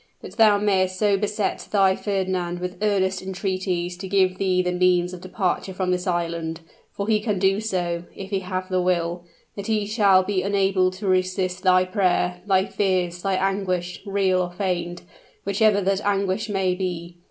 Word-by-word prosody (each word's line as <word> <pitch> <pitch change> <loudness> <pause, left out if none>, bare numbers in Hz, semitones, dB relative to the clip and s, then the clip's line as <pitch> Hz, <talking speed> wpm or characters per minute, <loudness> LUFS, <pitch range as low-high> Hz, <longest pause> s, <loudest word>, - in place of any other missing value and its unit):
But - - -11
thou 215 -3 +6
mayst 190 -2 +1
so 205 0 +3
beset 210 +1 -2
thy 195 -2 +3
Fernand 185 -4 -2
with 180 0 -5
earnest 190 -3 +1
entreaties 185 -2 -2
to 190 +1 -6
give 185 -1 +2
thee 185 -1 +2
the 180 - 0
means 180 0 +2
of 180 - -8
departure 185 0 -2
from 185 -1 -1
this 180 0 -1
island 170 -2 -2 0.3
for 200 - -4
he 220 -1 +3
can 210 -2 -1
do 195 +2 +2
so, 175 -5 -2
if 195 +1 -8
he 195 - +1
have 185 0 -4
the 185 -1 0
will 175 -1 0 0.3
that 200 -1 -6
he 215 -2 +1
shall 200 -3 +4
be 190 0 -1
unable 195 -2 +2
to 185 +3 -8
resist 185 0 0
thy 185 -1 +4
prayer 180 -2 0
thy 190 -1 +3
fears 180 -4 -1
thy 195 0 0
anguish, 185 -2 -1
real 195 -2 +1
or 180 -1 -3
feigned, 175 -2 -3 0.4
whichever 205 +1 +3
that 195 +1 0
anguish 200 +1 0
may 190 -2 +1
be. 175 -2 -4
185 Hz, 175 wpm, -23 LUFS, 180-200 Hz, 0.4 s, thou